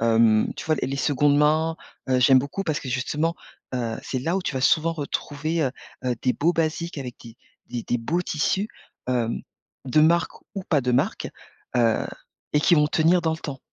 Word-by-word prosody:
hem, 115 -1 +4
tu - - -6
vois, 160 - +3
les - - 0
les 135 - -2
secondes 145 +1 +3
mains, 155 +2 +3 0.3
heu, 130 -1 +3
j'aime 130 +1 +7
beaucoup 140 +9 -3
parce 155 -1 0
que 135 - -7
justement, 145 +6 -1 0.4
heu, 115 -3 -2
c'est 130 - -3
là 165 +7 0
où 195 - -1
tu 150 - -3
vas 130 - -1
souvent 160 +5 +3
retrouver, 155 +1 -2
heu, 135 - +1 0.3
heu, 125 -1 +1
des 125 - +3
beaux 165 +7 +2
basiques 165 0 -1
avec 125 -3 -6
des 115 -1 -12 0.3
des 120 -1 -4
des 120 - 0
beaux 165 +10 -1
tissus, 185 +6 0 0.4
hem, 120 -2 0 0.5
de 130 +4 +3
marque 165 +2 +3 0.2
ou 195 - -3
pas 150 -4 +3
de 125 -1 0
marque, 125 - 0 0.5
heu 115 -2 +2 0.5
et 150 - +5
qui 175 - +5
vont 150 -2 +4
tenir 165 +4 +3
dans 160 - +1
le 160 - -4
temps. 140 -5 -6
145 Hz, 205 wpm, -24 LUFS, 125-160 Hz, 0.5 s, j'aime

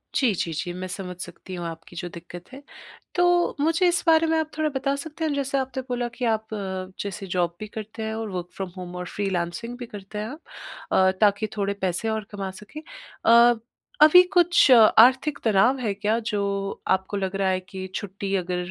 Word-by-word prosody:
जी, 250 -6 +3
जी, 170 -2 -2
जी। 175 +3 -4
मैं 185 +1 -5
समझ 180 -1 -6
सकती 180 +1 -8
हूँ 175 - -5
आपकी 165 +1 -10
जो 175 +1 -5
दिक्कत 175 +2 -11
है, 275 - -9 0.5
तो 355 0 +3
मुझे 330 +5 +2
इस 350 - +1
बारे 325 0 +5
में 320 0 +2
आप 315 -1 -2
थोड़ा 310 -1 +1
बता 275 +1 0
सकते 310 +3 -6
हैं 305 - 0
जैसे 275 -1 -1
आपने 265 -1 -2
बोला 245 -1 -1
कि 250 - -2
आप 220 -1 -1
अ, 190 -2 -4
जैसे 200 -1 -5
जॉब 175 -1 -1
भी 215 - -6
करते 220 +1 -7
हैं 220 - -3
और 220 -1 -4
वर्क़ 180 -1 -4
फ्रॉम 195 -2 -4
होम 180 -1 -7
और 180 0 -5
फ्रीलांसिंग 195 +5 -3
भी 245 - -6
करते 205 -1 -9
हैं 225 +8 -5 0.5
अ, 190 0 +4
ताकि 210 +1 +3
थोड़े 200 0 0
पैसे 185 +4 -1
और 220 -1 -2
कमा 195 -2 -4
सकें। 305 +9 -10 0.4
अ, 235 +1 +7 0.5
अभी 310 +4 +9
कुछ 350 -5 +5
आर्थिक 255 +5 +6
तनाव 225 +4 +4
है 215 -5 -1
क्या 210 +3 0
जो 205 - -1 0.5
आपको 190 +2 0
लग 190 0 -2
रहा 195 -1 +1
है 185 - +1
कि 185 0 -8
छुट्टी 200 0 -4
अगर 180 -1 -1
210 Hz, 200 wpm, -24 LUFS, 185-260 Hz, 0.5 s, अभी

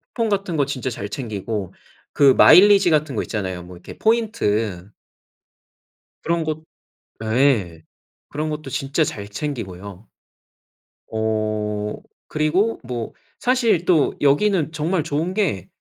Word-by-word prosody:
쿠폰 230 -3 0
같은 195 -5 -1
거 140 - +2
진짜 130 -2 -3
잘 100 -4 -5
챙기고 105 -4 -4 0.4
그 140 -2 +6
마일리지 195 -1 +7
같은 150 -4 +1
거 - - 0
있잖아요 95 -5 -4
뭐 90 +1 -12
이렇게 85 - -12
포인트. 110 - 0 1.3
그런 170 -1 0
것 155 0 -4 0.6
아 110 0 -2
예. 105 - +2 0.5
그런 155 +2 -3
것도 150 -2 -6
진짜 135 +5 -1
잘 100 -7 -5
챙기고요. 100 -6 -6 1.0
어 110 -1 -2 0.3
그리고 170 +9 0
뭐 120 -2 -5 0.3
사실 230 -9 +2
또 160 -6 +3
여기는 160 +3 +2
정말 160 +2 -1
좋은 155 +4 -2
게 185 - -1
140 Hz, 235 characters per minute, -21 LUFS, 105-170 Hz, 1.3 s, 마일리지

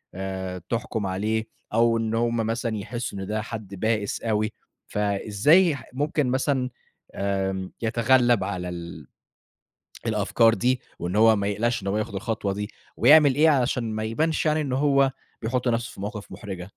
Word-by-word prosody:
آآ 95 -1 -4
تحكُم 115 -3 -2
عليه 110 +4 -1 0.3
أو 115 0 +4
إن 115 0 -1
هم 115 0 +1
مثلًا 115 0 -1
يحسّوا 115 0 -5
إن 95 - -5
ده 110 +1 -1
حد 110 -3 -7
بائِس 105 +1 -1
أوي، 110 -1 0 0.4
فإزاي 105 - +3
ح 140 - -9
ممكن 145 +1 0
مثلًا 130 0 0 0.5
آمم 95 -1 -2
يتغلّب 120 -1 +3
على 90 -2 -3
ال 85 -1 -8 1.0
الأفكار 115 +1 +3
دي 125 +2 +1 0.2
وإن 90 +3 -3
هو 110 +1 +6
ما 100 -1 -1
يقلقش 115 +3 0
إن - - -5
هو 100 - 0
ياخُد 105 -2 -3
الخطوة 100 0 -2
دي 105 +1 -4 0.3
ويعمل 145 +1 +7
إيه 155 +3 +5
علشان 125 -3 +2
ما 110 - -2
يبانش 155 +11 0
يعني 155 0 +2
إن 135 -3 -2
هو 140 0 +3 0.3
بيحُط 125 +3 -1
نَفْسه 120 0 0
في - - -10
مواقِف 105 +1 -6
مُحرِجة؟ 95 -4 -7
110 Hz, 160 wpm, -25 LUFS, 100-125 Hz, 1.0 s, ويعمل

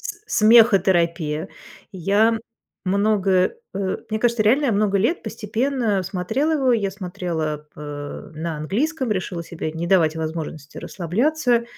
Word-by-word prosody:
с 415 - -7 0.2
смехотерапия. 185 -8 +4 0.4
Я 205 +5 +2 0.5
много, 200 +1 +1 0.4
э, 195 -1 -1
мне 220 - 0
кажется, 235 -1 +2
реально 255 +4 +3
много 200 -1 +2
лет 275 - +1
постепенно 225 0 -1
смотрела 190 - -1
его. 270 -5 +2
Я 205 -4 +1
смотрела, 175 -6 -4
э, 145 +1 -7
на 160 0 -4
английском, 255 - -1
решила 175 -3 -4
себе 165 -2 -5
не 165 +2 -4
давать 165 -4 +3
возможности 155 -2 -5
расслабляться 235 - 0
195 Hz, 120 wpm, -22 LUFS, 170-230 Hz, 0.5 s, смехотерапия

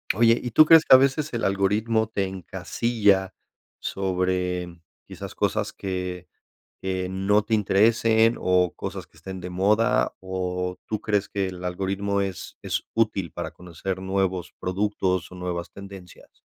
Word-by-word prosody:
Oye, 115 +2 +5
¿y 125 - -3
tú 155 - +7
crees 165 0 +7
que - - +9
a - - +10
veces 140 +3 +1
el 115 - -2
algoritmo 105 +3 +1
te 100 -3 -1
encasilla 95 +1 0 0.4
sobre 90 -2 -2 0.3
quizás - - -8
cosas - - 0
que 90 -2 -4 0.6
que 95 -1 -2
no 95 +3 +2
te 110 +2 -8
interesen 110 +2 +3
o 90 -1 +2
cosas 95 -2 -6
que 80 - -23
estén 95 +3 -7
de 90 +1 -6
moda? 105 +6 +2
¿O 90 -1 -3
tú 110 - -2
crees 105 -1 0
que 100 -1 -1
el 90 -1 -8
algoritmo 95 +2 -1
es 95 -3 -5
es - - -2
útil 105 -6 0
para - - -5
conocer 90 +2 -6
nuevos 95 -2 -1
productos 95 -1 -1
o - - -9
nuevas 90 -1 -4
tendencias? 100 -3 -13
95 Hz, 150 wpm, -25 LUFS, 90-105 Hz, 0.6 s, a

